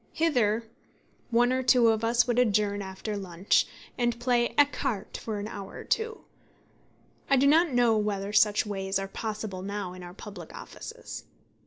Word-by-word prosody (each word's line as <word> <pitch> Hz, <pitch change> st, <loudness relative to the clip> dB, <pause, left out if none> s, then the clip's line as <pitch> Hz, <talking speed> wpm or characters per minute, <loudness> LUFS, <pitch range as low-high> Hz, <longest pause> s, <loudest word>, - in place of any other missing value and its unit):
Hither 235 Hz, -9 st, +2 dB, 0.7 s
one 245 Hz, +1 st, +3 dB
or 260 Hz, -, +1 dB
two 245 Hz, -2 st, +5 dB
of 220 Hz, 0 st, +1 dB
us 235 Hz, +1 st, +3 dB
would 245 Hz, -1 st, +1 dB
adjourn 205 Hz, -3 st, +2 dB
after 190 Hz, +2 st, -5 dB
lunch, 190 Hz, -1 st, +1 dB, 0.3 s
and 240 Hz, -1 st, +1 dB
play 240 Hz, -1 st, +1 dB
écarté 275 Hz, -7 st, +1 dB
for 220 Hz, -2 st, -4 dB
an 205 Hz, +1 st, -4 dB
hour 200 Hz, -3 st, -8 dB
or -, -, -7 dB
two. 445 Hz, 0 st, -1 dB, 1.1 s
I 275 Hz, -, +5 dB
do 265 Hz, -, +4 dB
not 320 Hz, +4 st, +5 dB
know 240 Hz, -2 st, +4 dB
whether 205 Hz, -1 st, -2 dB
such 210 Hz, 0 st, +4 dB
ways 195 Hz, -2 st, -2 dB
are 195 Hz, 0 st, -3 dB
possible 210 Hz, -2 st, -5 dB
now 200 Hz, -1 st, -4 dB
in 185 Hz, -, -10 dB
our 175 Hz, 0 st, -10 dB
public 200 Hz, -6 st, -10 dB
offices. -, -, -9 dB
215 Hz, 165 wpm, -28 LUFS, 200-245 Hz, 1.1 s, two